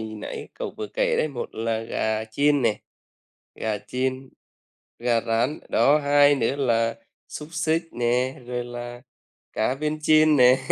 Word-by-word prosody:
nãy 110 -1 -7
cậu - - -5
vừa 105 - -4
kể 105 - 0
đấy, 155 - +1
một 125 -4 -6
là 115 0 -1
gà 110 -1 -2
chiên 140 +5 +1
nè, 110 -3 +1 0.7
gà 110 -2 -2
chiên, 130 +3 -3 0.7
gà 120 -1 +1
rán. 120 +6 0
Đó, 150 +2 +4
hai 145 0 +5
nữa 135 +1 0
là 115 -4 +1 0.3
xúc 150 0 -8
xích 160 0 +1
nè, 125 +2 0
rồi 125 -1 -3
là 120 0 -8 0.5
cá 115 +4 0
viên 155 +2 -3
chiên 155 0 +5
nè. 125 0 +6
125 Hz, 150 wpm, -24 LUFS, 115-145 Hz, 0.7 s, nè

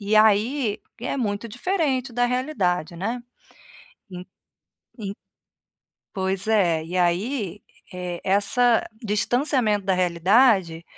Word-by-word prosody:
e 205 +1 -1
aí, 220 +2 +3 0.2
é 250 - -3
muito 225 -2 -2
diferente 265 - -1
da 245 +1 +1
realidade, 200 - -1
né. 230 +7 -3 0.9
En 180 0 -8 0.7
en 200 -2 -5 1.0
Pois 190 +1 -2
é. 175 -8 +2
E 180 +3 -5
aí, 195 +3 0 0.3
eh, 180 -1 -5
essa 215 +5 +3 0.2
distanciamento 220 0 +1
da 190 - +1
realidade, 180 0 +3
205 Hz, 105 wpm, -23 LUFS, 185-245 Hz, 1.0 s, aí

